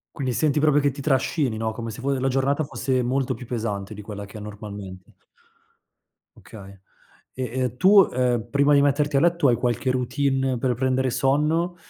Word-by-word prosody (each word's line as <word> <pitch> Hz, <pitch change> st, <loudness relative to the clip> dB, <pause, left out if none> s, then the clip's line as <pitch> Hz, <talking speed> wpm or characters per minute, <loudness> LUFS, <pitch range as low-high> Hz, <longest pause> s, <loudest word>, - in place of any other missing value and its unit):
Quindi 130 Hz, -3 st, -2 dB
senti 150 Hz, +1 st, +1 dB
proprio 150 Hz, -1 st, +4 dB
che 145 Hz, -1 st, +1 dB
ti 140 Hz, +2 st, -8 dB
trascini, 135 Hz, -3 st, 0 dB
no, 110 Hz, 0 st, -2 dB
come 115 Hz, 0 st, -6 dB
se 110 Hz, -, -8 dB
fo 140 Hz, +2 st, -1 dB
la 135 Hz, 0 st, 0 dB
giornata 135 Hz, +3 st, +1 dB
fosse 130 Hz, -2 st, -1 dB
molto 130 Hz, +2 st, -1 dB
più 125 Hz, -, -10 dB
pesante 105 Hz, -4 st, -4 dB
di 105 Hz, -, -9 dB
quella 100 Hz, -1 st, -7 dB
che 100 Hz, +2 st, -11 dB
è -, -, -7 dB
normalmente. 100 Hz, -3 st, -9 dB, 1.2 s
Okay. 100 Hz, -3 st, -13 dB, 0.6 s
E 130 Hz, -, -3 dB, 0.2 s
e 125 Hz, 0 st, -3 dB
tu, 195 Hz, +1 st, +6 dB
ehm, 120 Hz, -2 st, 0 dB
prima 140 Hz, +3 st, +3 dB
di 140 Hz, -, +5 dB
metterti 145 Hz, 0 st, +1 dB
a -, -, +5 dB
letto, 170 Hz, -1 st, +2 dB
hai 120 Hz, -, +4 dB
qualche 125 Hz, +2 st, -1 dB
routine 135 Hz, +1 st, 0 dB
per 125 Hz, +1 st, 0 dB
prendere 130 Hz, +1 st, 0 dB
sonno, 150 Hz, +7 st, +1 dB
130 Hz, 185 wpm, -23 LUFS, 115-140 Hz, 1.2 s, tu